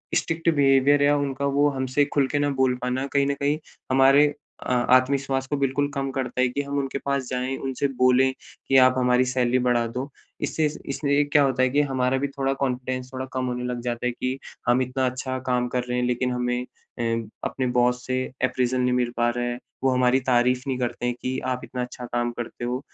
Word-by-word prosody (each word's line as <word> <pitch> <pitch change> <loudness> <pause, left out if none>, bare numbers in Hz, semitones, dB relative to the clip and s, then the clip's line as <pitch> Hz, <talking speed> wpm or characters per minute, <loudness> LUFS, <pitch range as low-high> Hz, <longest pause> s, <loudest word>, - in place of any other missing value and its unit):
Strict 165 0 0
behaviour 140 0 +4
या 145 +1 +4
उनका 140 -1 -2
वो 145 +1 +4
हमसे 135 +1 0
खुल 140 -2 +3
के 145 - -1
ना 145 0 +1
बोल 130 -1 +3
पाना 125 +2 -1
कहीं 140 0 +3
न 140 - +1
कहीं 145 +2 +1 0.3
हमारे 135 +2 +6 0.4
अ, - - -2
आत्मविश्वास 135 +2 +2
को 145 - -1
बिल्कुल 140 +1 +1
कम 135 0 -2
करता 130 -1 -2
है 130 - +4
कि 140 +3 -2
हम 140 0 -4
उनके 135 0 -3
पास 140 -2 -1
जाएँ, 130 +1 -2
उनसे 135 +1 -2
बोलें 130 +1 +4 0.4
कि 135 - +4
आप 130 0 +6
हमारी 125 0 +3
सैलरी 125 0 +2
बढ़ा 120 -1 +2
दो। 125 +5 -5 0.3
इससे 160 - 0 0.2
इसलिए 140 +1 +1
क्या 145 0 +4
होता 130 -2 +1
है 130 - +3
कि 145 +3 +2
हमारा 130 -2 0
भी 140 +1 -1
थोड़ा 135 -1 -1
कॉन्फिडेंस 130 0 -3
थोड़ा 130 0 -4
कम 130 -1 -1
होने 125 0 -3
लग 125 -1 -3
जाता 120 0 -3
है 125 - +1
कि 130 +2 -3 0.3
हम 120 +2 +4
इतना 130 +1 -1
अच्छा 130 +1 -4
काम 125 -1 +1
कर 125 - +1
रहे 125 0 -3
हैं, 125 - +1
लेकिन 125 +1 0
हमें 125 0 -1 0.4
अ, - - -1 0.5
अपने 130 -1 -2
बॉस 125 0 +1
से 130 0 -1 0.2
अप्रैज़ल 125 0 +1
नहीं 125 0 +2
मिल 125 -1 +1
पा 120 0 +3
रहा 120 0 -2
है, 120 0 -2 0.3
वो 135 - +4
हमारी 125 +1 +3
तारीफ़ 125 0 +3
नहीं 130 -2 -1
करते 120 0 -2
हैं 120 0 0
कि 130 0 -2
आप 125 -1 -2
इतना 125 - -5
अच्छा 125 0 -6
काम 120 0 -1
करते 120 0 -6
हो। 125 +1 -2
130 Hz, 220 wpm, -24 LUFS, 125-135 Hz, 0.5 s, हमारे